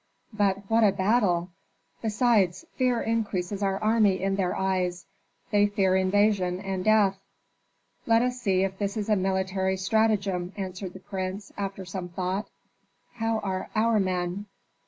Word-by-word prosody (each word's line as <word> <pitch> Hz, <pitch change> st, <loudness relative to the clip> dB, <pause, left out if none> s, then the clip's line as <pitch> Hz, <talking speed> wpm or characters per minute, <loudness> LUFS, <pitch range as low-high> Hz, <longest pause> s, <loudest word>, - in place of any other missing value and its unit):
"But 200 Hz, -2 st, 0 dB
what 225 Hz, +1 st, +3 dB
a 205 Hz, -, +6 dB
battle! 190 Hz, -3 st, +1 dB, 0.5 s
Besides, 215 Hz, -, +2 dB
fear 250 Hz, -3 st, +1 dB
increases 205 Hz, -4 st, -2 dB
our 195 Hz, -1 st, +1 dB
army 215 Hz, -3 st, +3 dB
in 195 Hz, +1 st, 0 dB
their 190 Hz, -2 st, 0 dB
eyes. 185 Hz, -2 st, -1 dB, 0.5 s
They 205 Hz, -1 st, +4 dB
fear 195 Hz, -2 st, +1 dB
invasion 190 Hz, -1 st, +2 dB
and 190 Hz, -1 st, -3 dB
death." 205 Hz, -2 st, +3 dB, 0.9 s
"Let 230 Hz, 0 st, +4 dB
us 250 Hz, 0 st, -2 dB
see 190 Hz, -4 st, +2 dB
if 190 Hz, 0 st, -3 dB
this 200 Hz, +1 st, -2 dB
is 215 Hz, 0 st, -3 dB
a 210 Hz, -, +4 dB
military 190 Hz, 0 st, 0 dB
stratagem," 195 Hz, -2 st, +1 dB
answered 190 Hz, -1 st, -5 dB
the 190 Hz, -, -10 dB
prince, 190 Hz, 0 st, -5 dB
after 195 Hz, -1 st, -4 dB
some 180 Hz, 0 st, -5 dB
thought. 185 Hz, +4 st, -3 dB, 0.7 s
"How 225 Hz, -1 st, 0 dB
are 190 Hz, -2 st, -3 dB
our 220 Hz, 0 st, +3 dB
men?" 185 Hz, +1 st, -2 dB
195 Hz, 145 wpm, -27 LUFS, 185-215 Hz, 0.9 s, a